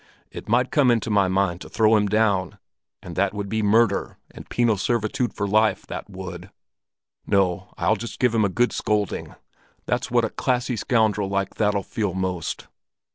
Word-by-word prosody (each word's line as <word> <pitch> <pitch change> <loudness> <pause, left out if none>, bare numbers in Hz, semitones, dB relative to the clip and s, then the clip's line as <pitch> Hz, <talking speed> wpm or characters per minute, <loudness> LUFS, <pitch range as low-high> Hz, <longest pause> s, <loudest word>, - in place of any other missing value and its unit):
It - - -9
might 125 +3 +2
come 140 -4 +4
into 115 -2 +1
my 100 -2 +3
mind 95 -1 0
to - - -9
throw 110 0 +3
him 105 -1 +2
down, 100 -3 +1 0.5
and 85 -2 -8
that 100 +1 0
would 100 -1 -3
be 110 +2 -1
murder 105 0 +2
and - - -12
penal 120 -3 +2
servitude 115 +3 -1
for 100 - -3
life, 110 0 +2
that - - -7
would! 95 -2 -8 0.8
No, 95 -4 +1
I'll - - +2
just 115 - -7
give 125 -2 +2
him 110 -2 +3
a 100 - +2
good 120 +6 +1
scolding; 105 -2 -2 0.5
that's - - -1
what - - +2
a - - -4
classy 125 0 -1
scoundrel 110 -3 +1
like 100 0 -1
that'll 105 -2 0
feel 100 -3 -3
most." 95 -3 -3
105 Hz, 180 wpm, -23 LUFS, 95-115 Hz, 0.8 s, come